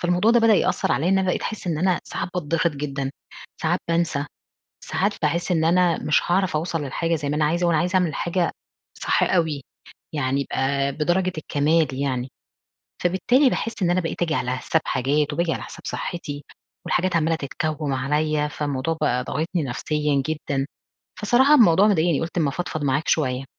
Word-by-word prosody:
فالموضوع 180 +5 +2
ده 240 0 +5
بدأ 225 -1 +5
يأثّر 185 -2 +1
عليّا 160 +5 +1
إن 190 0 +3
بقيت 180 - 0
أحس 215 -3 -5
إن 160 -3 -1
أنا 185 +1 +1
ساعات - - -4
باتضِغط 165 0 0
جدًا، 140 -2 -3 0.5
ساعات 175 +3 +1
بانسى، 165 -4 0 0.6
ساعات 200 +2 0
باحس 170 +4 0
إن 160 -2 +2
أنا 175 0 +3
مش 150 - +3
هاعرف 185 -1 +1
أوصل 165 +1 -1
للحاجة 165 +5 -1
زي 145 -2 -3
ما 150 - 0
أنا 150 - +2
عايزة، 170 +3 +1
وأنا 170 -2 +3
عايزة 180 +4 0
أعمل 175 -5 +1
حاجة 175 0 0 0.5
صح - - +2
أوي. 160 -6 +1 0.5
يعني 135 -1 0
يبقى 140 0 0
بدرجة 175 +5 0
الكَمال 155 +1 +1
يعني. 130 -2 -2 0.7
فبالتالي 215 - +3
باحس 225 -2 -2
إن 175 - +3
أنا 180 +1 +2
بقيت 165 0 -3
أجي 160 -2 +1
على 125 -2 -1
حساب 160 +5 0
حاجات 145 +3 0
وباجي 170 -1 0
على - - -4
حساب - - -9
صحتي. 145 -4 -5 0.4
والحاجات 180 -1 +1
عمّالة 165 0 +2
تتكوّم 150 0 -3
عليّا، 150 +3 0
فالموضوع 145 +2 -2
بقى 125 0 +1
ضاغطني 165 +5 -2
نفسيًا 145 +2 -1
جدًا. 145 -3 -2 0.5
فصراحة 250 +7 +5
الموضوع 205 - +6
مضايقني 170 -5 +2
قُلت 170 +2 -3
أمّا 155 -4 +2
أفضفض 155 -1 -4
معاك 140 +3 0
شوية. 130 -4 +1
160 Hz, 175 wpm, -23 LUFS, 145-180 Hz, 0.7 s, الموضوع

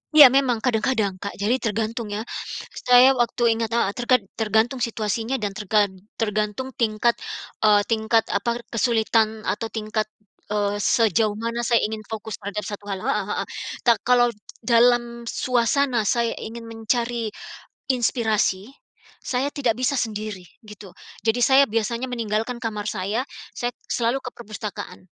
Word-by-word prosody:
Iya, 290 -5 +11
memang 255 -4 +2
kadang-kadang, 220 -5 0
Kak. 200 - -5
Jadi 220 +6 0
tergantung 225 +1 -2
ya. 210 +1 -4 0.6
Saya 250 +1 +8
waktu 240 -1 0 0.2
ingat 225 -1 -1
heeh. 215 -4 +2
Terked 245 +1 +2 0.2
tergantung 220 +4 +1
situasinya 225 +1 -1
dan 210 -6 -2
tergan 205 0 +1 0.2
tergantung 215 +4 -2
tingkat, 230 +1 +2 0.4
eee, 210 -1 +5
tingkat, 225 0 +3
apa, 235 0 -1
kesulitan 220 -2 +1
atau 225 +1 -2
tingkat, 215 0 -2 0.4
eee, 205 0 -1
sejauh 215 -2 +2
mana 230 +2 -3
saya 235 -2 +3
ingin 220 +1 -2
fokus 220 -2 -6
terhadap 205 +1 -4
satu 205 0 -7
hal. 195 -1 -4
Heeh 275 +3 0
heeh. - - -2 0.4
Ta 235 -3 +4
kalau 245 -1 +3 0.3
dalam 235 0 +3
suasana 250 -2 +1
saya 235 0 +2
ingin 230 +1 -7
mencari 230 +1 -2 0.6
inspirasi, 220 -4 0 0.5
saya 265 +3 -1
tidak 255 -7 0
bisa 255 +2 0
sendiri. 210 -5 -4 0.2
Gitu. 210 -1 -11 0.4
Jadi 225 +2 +2
saya 270 +2 +6
biasanya 230 +3 -1
meninggalkan 235 0 -2
kamar 210 -2 -3
saya, 210 +6 -2 0.2
saya 245 0 -3 0.2
selalu 240 +3 0
ke 250 - -5
perpustakaan. 215 -4 -7
225 Hz, 140 wpm, -23 LUFS, 215-245 Hz, 0.6 s, Iya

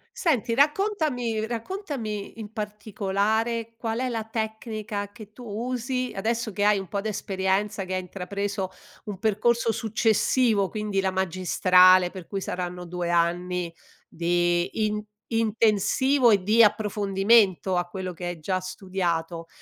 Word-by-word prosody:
Senti, 290 - +1
raccontami 280 - +1
raccontami, 230 - -5
in 215 -1 -8
particolare, 215 +1 -1
qual 225 -1 -3
è 255 - -1
la 225 -2 -2
tecnica 220 -2 -4
che 215 -1 -13
tu 245 - -12
usi, 250 +3 -3
adesso 225 +3 -1
che 205 - -1
hai 210 0 +5
un 195 -1 -5
po' 200 +3 -2
d'esperienza 195 -1 -1
che 185 0 -3
hai 185 - -1
intrapreso 195 +1 -4 0.4
un 205 -2 -5
percorso 225 +3 +1
successivo, 220 -1 +2
quindi 210 -3 -1
la 190 - +1
magistrale, 185 0 +4
per 185 -4 -9
cui 195 -1 -4
saranno 180 -1 -4
2 175 0 -3
anni, 175 0 0 0.3
di 175 +4 0
in 210 0 -2 0.3
intensivo 225 +4 +3
e 200 -4 +4
di 220 +4 +4
approfondimento 200 -2 +3
a 175 0 +1
quello 185 0 -5
che 175 +1 -7
hai 175 -1 -5
già 185 +4 -1
studiato. 180 -3 -3
205 Hz, 135 wpm, -25 LUFS, 185-225 Hz, 0.4 s, hai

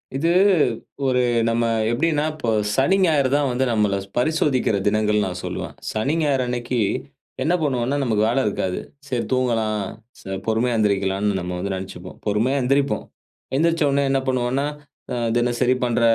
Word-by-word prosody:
இது 160 +5 +1 0.8
ஒரு 125 -1 +2 0.3
நம்ம 115 +1 +1 0.3
எப்டின்னா 150 +4 +1
இப்போ 140 -7 -3 0.2
சனி, 140 - +3
ஞாயிறு 150 -6 +3
தான் 145 -1 +2
வந்து 125 +2 +1
நம்மள 105 -3 +2 0.2
பரிசோதிக்கிற 130 -4 +1
தினங்கள் 105 0 +2
நான் 90 -1 -4
சொல்லுவேன். - - -5 0.2
சனி, 120 +7 0
ஞாயிறு 140 -4 +2
அன்னைக்கி 120 0 -2 0.6
என்ன 165 - +2
பண்ணுவோம்ன்னா, 135 -2 0
நமக்கு 110 -4 +1
வேல 120 +3 0
இருக்காது. 95 -3 -1 0.3
சரி 125 -4 -1
தூங்கலாம் 115 -5 +1 0.4
ச 95 0 -5
பொறுமையா 115 +2 +1
எந்திருக்கலாம்னு 100 -1 +1
நம்ம 90 0 -4
வந்து 100 +2 -2
நினைச்சிப்போம். 95 -1 -8
பொறுமையா 115 +7 +1
எந்திரிப்போம். 135 +2 +1 0.5
எந்திரிச்ச 165 +1 +2
உடனே 140 +1 +2
என்ன 135 - +2
பண்ணுவோன்னா, 130 +2 0 0.5
அ - - -1 0.2
தினசரி 120 +1 +2
பண்ற 120 -1 +1
120 Hz, 145 wpm, -22 LUFS, 105-135 Hz, 0.8 s, சனி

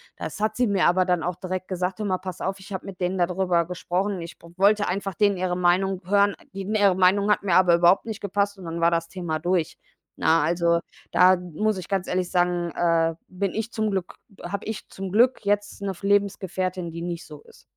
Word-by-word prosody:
Das - - -6
hat 215 +1 0
sie 250 0 +2
mir 200 -3 +2
aber 185 +1 +4
dann 180 -2 +1
auch 175 +2 -2
direkt 185 +1 -5
gesagt: 185 +1 -3
„Hör 210 - -2
mal, 185 -2 0
pass 185 -1 -7
auf, 190 0 -3
ich 200 - -13
habe 190 - -5
mit 190 -2 -9
denen 180 +1 0
da 175 - +3
drüber 180 -1 +1
gesprochen. 180 +2 -2
Ich 170 +1 -9
w 170 - -14
wollte 205 +2 +3
einfach 195 0 -3
denen 205 -1 +3
ihre 180 -1 -1
Meinung 180 +1 +2
hören. 200 +1 +3 0.2
Die 195 - -5
ihre 200 -1 +3
Meinung 190 +2 +3
hat 210 - +2
mir 185 -4 +2
aber 180 -2 +6
überhaupt 175 +3 +4
nicht 220 -2 -6
gepasst." 200 0 -1
und 185 - -10
dann 165 0 -4
war 170 0 +3
das 165 0 -1
Thema 170 -4 -3
durch. 175 0 -1 0.4
Na, 160 -1 +3
also 170 +1 +2 0.3
da 185 +1 +6
muss 180 +4 -2
ich 180 - -8
ganz 195 -2 -1
ehrlich 180 -1 -1
sagen, 175 -1 +1
äh, 165 -1 +2
bin 190 +1 -2
ich 220 +1 -3
zum 220 -1 -1
Glück 190 -3 -3 0.3
habe 200 - -4
ich 220 -2 -5
zum 190 -1 -7
Glück 245 +4 +3
jetzt 205 0 -1
‘ne 200 - -2
f 190 +1 -12
Lebensgefährtin, 190 -3 0
die 170 +1 -7
nicht 170 -1 -5
so 150 -2 -12
ist. - - -20
185 Hz, 230 wpm, -24 LUFS, 175-200 Hz, 0.4 s, aber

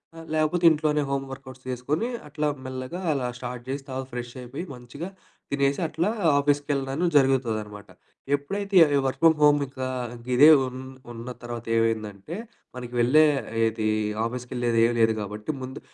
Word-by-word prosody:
అ! - - -9
లేకపోతే 155 +3 +1
ఇంట్లోనే 150 -1 +1
home 140 0 0
workouts 130 -1 -10
చేసుకొని 135 - -1 0.2
అట్లా 150 +1 -2 0.2
మెల్లగా 130 +6 -5
అలా 135 -4 -1
స్టార్ట్ 125 -1 -6
జేసి 135 +1 -3
తర్వాత 130 0 -4
ఫ్రెషయిపోయి 125 +4 -6
మంచిగా 125 +7 -8 0.4
తినేసి 140 0 +1
అట్లా 160 +5 -1 0.3
ఆఫీసుకెళ్ళడం 145 +2 0
జరుగుతదనమాట. 115 -7 +1 0.5
ఎప్పుడైతే 195 +7 -2 0.3
వర్క్ 130 - -1
ఫ్రమ్ 165 -1 +7
హోమ్ 145 0 +6
ఇంకా 130 -1 -5 0.5
ఇదే 145 +5 +8 0.2
ఉన్ 130 0 -7 0.3
ఉన్న 115 +1 -8 0.2
తర్వాత 120 -1 -6
ఏమైందంటే. 110 - -1 0.4
మనకి 125 -1 -7
వెళ్ళేది 120 -5 +3 0.3
ఆఫీసుకి 125 +1 -4
వెళ్ళేది 120 -2 +1
ఏమి 120 +1 +1
లేదు 110 0 +4
కాబట్టి 105 +5 -4
ముందు 130 +1 -6
130 Hz, 135 wpm, -25 LUFS, 120-145 Hz, 0.5 s, ఇదే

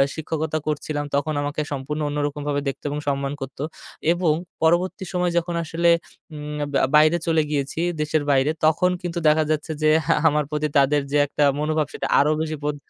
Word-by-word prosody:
শিক্ষকতা 160 0 -2
করছিলাম 150 0 -2
তখন 145 +2 0
আমাকে 145 +1 -2
সম্পূর্ণ 145 +3 -4
অন্যরকমভাবে 145 0 -2
দেখতো 135 - -7
এবং 145 +1 -3
সম্মান 140 0 -1
করতো 135 +1 -6 0.5
এবং 175 -3 +2 0.3
পরবর্তী 175 +3 +2
সময়ে 180 -1 +1
যখন 170 0 -1
আসলে 170 +2 +1 0.4
উম 150 0 -6 0.3
আ - - -3
বাইরে 155 +3 +6
চলে 160 -1 +3
গিয়েছি 140 +2 -2 0.2
দেশের 150 0 0
বাইরে 135 +2 +3
তখন 165 +4 +3
কিন্তু 175 -1 -3
দেখা 155 +1 +4
যাচ্ছে 155 +1 -2
যে, 155 - +5 0.4
আমার 150 0 +2
প্রতি 150 0 0
তাদের 140 +1 +4
যে, 145 - +2
একটা 145 - 0 0.2
মনোভাব 155 -1 0
সেটা - - -3
আরও 150 +2 +3
বেশি 155 -1 -2
বদ 150 0 -1
150 Hz, 170 wpm, -23 LUFS, 145-160 Hz, 0.5 s, বাইরে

